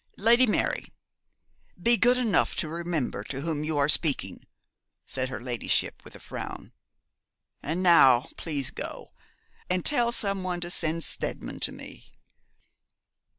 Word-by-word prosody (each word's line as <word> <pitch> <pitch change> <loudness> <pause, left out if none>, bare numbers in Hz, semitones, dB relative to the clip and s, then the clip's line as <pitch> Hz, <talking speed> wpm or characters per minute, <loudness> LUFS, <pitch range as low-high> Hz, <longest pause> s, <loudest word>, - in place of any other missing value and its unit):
'Lady 235 +4 +4
Mary, 210 - -1 0.9
be 235 +7 +4
good 245 +2 +3
enough 230 -7 +1
to 155 - -1
remember 165 -9 -3
to 135 +5 -6
whom 155 -1 -2
you 155 -1 -2
are 140 0 +3
speaking,' 150 -1 +2 0.6
said 130 -1 -2
her 130 - -5
ladyship, 120 -2 -1
with - - -12
a - - -12
frown. - - -8 0.9
'And 165 +5 -3
now 135 -9 +6
please 145 -5 -3
go, - - -8 0.6
and 180 0 0
tell 240 -5 +2
some 200 -4 +1
one 180 -1 -3
to 175 0 -3
send 165 -1 +2
Steadman - - -1
to - - -3
me.' - - -11
170 Hz, 140 wpm, -27 LUFS, 140-195 Hz, 0.9 s, now